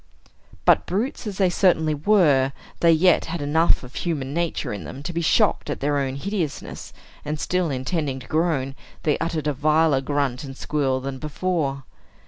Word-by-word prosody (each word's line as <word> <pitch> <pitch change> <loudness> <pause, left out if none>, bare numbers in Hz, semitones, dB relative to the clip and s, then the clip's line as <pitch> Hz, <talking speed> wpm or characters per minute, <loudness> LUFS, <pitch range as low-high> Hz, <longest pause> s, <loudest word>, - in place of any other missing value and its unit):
But - - +4
brutes 220 +4 -2
as 200 -2 -5
they 190 -3 +3
certainly 160 -4 +3
were, 145 -6 +3 0.3
they 170 - +5
yet 170 +2 +4
had 170 +1 -4
enough 150 +3 +2
of 125 - -11
human 145 -6 -3
nature 170 -8 -2
in 100 -4 -6
them 135 - -8
to 175 - -4
be 170 - -1
shocked 200 +1 +2
at 145 - -3
their 145 +1 +1
own 135 -1 -2
hideousness; 175 -1 -4 0.3
and 150 +1 -3
still 180 +2 0
intending 135 +1 -2
to - - -11
groan, 155 -5 0 0.3
they 150 - +1
uttered 165 -2 -2
a 150 - +1
viler 155 0 +3
grunt 140 -2 -1
and 135 -1 -8
squeal 135 -3 0
than 135 0 -5
before. 150 -3 -2
150 Hz, 175 wpm, -23 LUFS, 135-170 Hz, 0.3 s, they